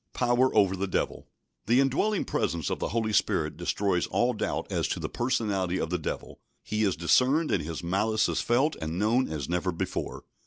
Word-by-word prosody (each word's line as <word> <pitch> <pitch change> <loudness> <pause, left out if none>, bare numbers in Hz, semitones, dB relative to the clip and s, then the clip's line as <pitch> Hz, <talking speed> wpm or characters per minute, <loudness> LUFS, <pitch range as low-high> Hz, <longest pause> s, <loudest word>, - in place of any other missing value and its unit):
Power 125 +1 +3
over 100 -3 +4
the 95 +1 -2
Devil. 95 - -2 0.4
The 120 +3 +4
indwelling 145 +10 +1
presence 85 -2 -1
of - - -2
the - - -1
Holy 110 -1 -1
Spirit - - +1
destroys 95 -4 0
all 120 +6 +1
doubt 110 - -2
as - - 0
to - - -2
the - - -3
personality 105 -7 0
of 80 - -2
the 90 - 0
Devil. - - -5 0.2
He 105 0 -2
is 95 -3 +2
discerned, 130 - +3
and 90 - +2
his 80 +2 -5
malice 110 +5 +1
is - - -1
felt 130 +6 +2
and 80 +2 -3
known 115 +6 +2
as 75 -4 -3
never 90 +2 0
before. 85 - -4
105 Hz, 195 wpm, -28 LUFS, 90-125 Hz, 0.4 s, over